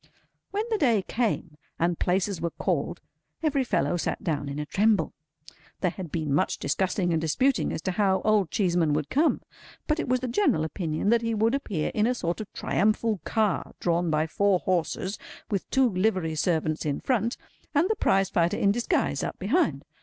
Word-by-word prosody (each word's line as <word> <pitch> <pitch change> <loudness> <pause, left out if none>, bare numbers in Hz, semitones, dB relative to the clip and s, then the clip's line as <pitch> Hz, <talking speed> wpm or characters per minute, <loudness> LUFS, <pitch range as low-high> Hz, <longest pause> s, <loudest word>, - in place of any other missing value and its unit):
When 415 +2 -1
the 435 - +1
day 230 -9 +3
came, 185 -9 -2 0.2
and 170 0 0
Places 185 -1 0
were 170 - 0
called, - - -2 0.4
every 280 -4 +2
fellow 210 -7 0
sat - - -3
down 145 -3 -1
in 140 - -5
a 150 - -3
tremble. 200 0 +2 0.7
There 180 - +2
had 175 -4 -7
been 155 -4 -1
much 145 - +1
discussing 185 +3 0
and 160 - +1
disputing 255 - +1
as - - -4
to 190 - 0
how 190 -1 +2
Old 210 -5 +3
Cheeseman 175 -6 +1
would 150 -1 -2
come; 305 +4 +2 0.4
but 305 +1 0
it 300 - -2
was 255 0 +2
the 255 - -2
general 210 -9 +2
opinion 160 +2 -2
that 235 0 +4
he 230 -1 -1
would 220 +3 +2
appear 205 - -1
in 215 +1 +2
a 250 - +1
sort 175 -2 -2
of 210 - -8
triumphal 215 0 +1
car 215 -4 0
drawn 170 0 +1
by 155 0 +2
four 200 +4 +2
horses, 185 +2 -1 0.3
with 200 -3 -2
two 265 -1 +4
livery 185 -4 0
servants 155 -1 0
in 145 -3 -1
front, 235 -2 0 0.4
and 310 +5 +4
the 440 - +1
Prizefighter 190 - +2
in 200 - +3
disguise 205 -10 0
up - - -4
behind. 250 - +1
190 Hz, 185 wpm, -27 LUFS, 165-230 Hz, 0.7 s, that